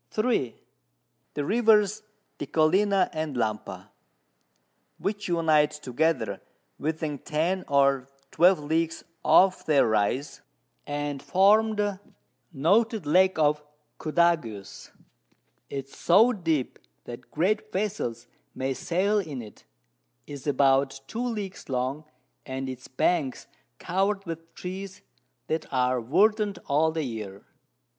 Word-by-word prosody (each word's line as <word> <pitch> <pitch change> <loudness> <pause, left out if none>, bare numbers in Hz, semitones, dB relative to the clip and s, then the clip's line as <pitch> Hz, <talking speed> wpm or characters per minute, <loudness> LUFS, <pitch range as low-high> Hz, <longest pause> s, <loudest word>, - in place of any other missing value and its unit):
3. 215 - -1 0.8
The 145 - -2
Rivers 215 0 +3 0.4
Decollina 185 +6 +2
and 155 -3 -3
Lampa, 110 -3 -3 1.1
which 205 +1 -3
unite 160 -4 +3
together 150 +3 -1 0.4
within 155 -1 -3
10 170 +7 -1
or 140 -2 +2 0.2
12 175 0 +4
Leagues 160 +2 -1 0.2
off 185 0 +5
their 150 -3 +3
Rise, 110 +6 0 0.5
and 145 -1 -3
form 215 +4 +4
the 205 -2 -1 0.5
noted 205 - +2
Lake 185 +5 +4
of 150 -1 +2 0.4
Cudagues. 155 - -1 0.8
It 135 -1 -4
is 135 - -18
so 225 +8 +4
deep, 165 - -2 0.2
that 120 +1 -10
great 210 +7 0
Vessels 185 - -3 0.3
may 135 +1 -1
sail 185 - 0
in 155 -9 -5
it, 105 - -15 0.6
is 145 0 -9
about 135 -1 +2
2 235 +2 -3
Leagues 210 -9 -5
long, 130 +4 -2 0.4
and 130 0 -5
its 130 -1 -7
Banks 140 0 0 0.3
cover'd 195 +3 -1
with 165 0 -8
Trees 190 +1 -7 0.4
that 160 +4 -3
are 125 -1 +1
verdant 205 - +2
all 155 +3 +2
the 160 -1 -2
Year. 105 -6 -7
160 Hz, 110 wpm, -26 LUFS, 135-195 Hz, 1.1 s, off